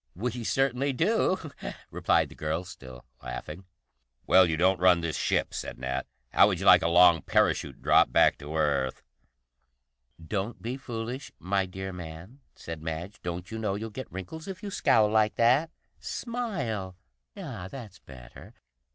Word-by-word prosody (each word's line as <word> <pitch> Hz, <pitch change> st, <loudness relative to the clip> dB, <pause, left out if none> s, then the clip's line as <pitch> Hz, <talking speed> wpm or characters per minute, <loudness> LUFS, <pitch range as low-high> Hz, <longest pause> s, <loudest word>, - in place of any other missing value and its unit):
"We 120 Hz, +4 st, -3 dB
certainly 135 Hz, +3 st, +1 dB
do," 185 Hz, -, +1 dB, 0.4 s
replied -, -, +2 dB
the -, -, -12 dB
girl, 80 Hz, +3 st, -2 dB
still 65 Hz, -9 st, -12 dB, 0.2 s
laughing. 75 Hz, +9 st, -7 dB, 0.6 s
"Well, 95 Hz, -1 st, +6 dB
you 80 Hz, -, 0 dB
don't 95 Hz, +1 st, +3 dB
run 90 Hz, -1 st, +5 dB
this 85 Hz, -2 st, -2 dB
ship," -, -, 0 dB
said -, -, -5 dB
Nat. 65 Hz, 0 st, -3 dB, 0.2 s
"How -, -, +6 dB
would -, -, -1 dB
you -, -, -4 dB
like -, -, +8 dB
a 80 Hz, -, +1 dB
long 85 Hz, -1 st, +6 dB
parachute -, -, 0 dB
drop -, -, +5 dB
back -, -, +4 dB
to 75 Hz, +2 st, -7 dB
Earth?" 70 Hz, -4 st, 0 dB, 1.2 s
"Don't 95 Hz, +7 st, -4 dB
be 120 Hz, +3 st, -4 dB
foolish, 125 Hz, 0 st, -6 dB
my 95 Hz, +1 st, -1 dB
dear 95 Hz, +1 st, -6 dB
man," 90 Hz, -, -9 dB, 0.2 s
said 80 Hz, -1 st, -8 dB
Madge. 80 Hz, +5 st, -6 dB
"Don't 90 Hz, +2 st, -5 dB
you 110 Hz, -, -4 dB
know 105 Hz, -3 st, -1 dB
you'll 110 Hz, +2 st, -5 dB
get 130 Hz, +5 st, -8 dB
wrinkles 125 Hz, -, -7 dB
if 190 Hz, +1 st, -7 dB
you 205 Hz, -, -5 dB
scowl 110 Hz, -, +3 dB
like 110 Hz, 0 st, +2 dB
that? 130 Hz, +8 st, +3 dB, 0.3 s
Smile! 135 Hz, -, -4 dB, 0.4 s
Ah, 90 Hz, -, -6 dB
that's 110 Hz, -7 st, -10 dB
better. 60 Hz, -3 st, -13 dB
95 Hz, 160 wpm, -28 LUFS, 80-125 Hz, 1.2 s, like